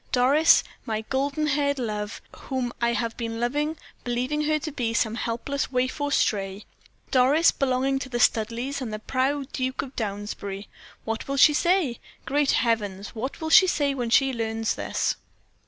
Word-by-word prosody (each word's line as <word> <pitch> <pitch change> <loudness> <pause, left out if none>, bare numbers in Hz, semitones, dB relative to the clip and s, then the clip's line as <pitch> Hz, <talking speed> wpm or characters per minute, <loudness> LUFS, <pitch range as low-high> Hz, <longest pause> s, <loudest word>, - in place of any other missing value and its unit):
Doris, 275 +6 +5 0.2
my 220 -1 -2
golden 275 +6 -1
haired 285 -1 +1
love, 210 -4 -4
whom 255 -3 -3
I 235 0 +2
have 230 -1 -2
been 230 -1 -4
loving, 295 +6 -1 0.3
believing 255 +5 -1
her 310 0 +2
to 310 +1 -5
be 230 -4 -2
some 220 -1 +1
helpless 240 +5 -3
waif 255 +3 -1
or 290 0 0
stray. 195 -5 0 0.5
Doris, 275 +6 +5
belonging 270 0 0
to 265 - -6
the 240 - -2
Studleighs 240 +5 +1
and 240 -4 -4
the 215 - -3
proud 270 +4 -1
Duke 260 0 -2
of 270 -1 -10
Downsbury 205 -2 -4 0.4
what 225 0 -3
will 275 0 -2
she 300 +3 +7
say? 340 -6 +1 0.3
Great 285 0 +1
heavens! 205 -4 0
what 250 +4 -5
will 315 0 -3
she 375 - +8
say 290 -5 +1
when 245 -3 -2
she 270 +3 +4
learns 225 -1 -1
this?" - - -1
255 Hz, 170 wpm, -25 LUFS, 225-280 Hz, 0.5 s, she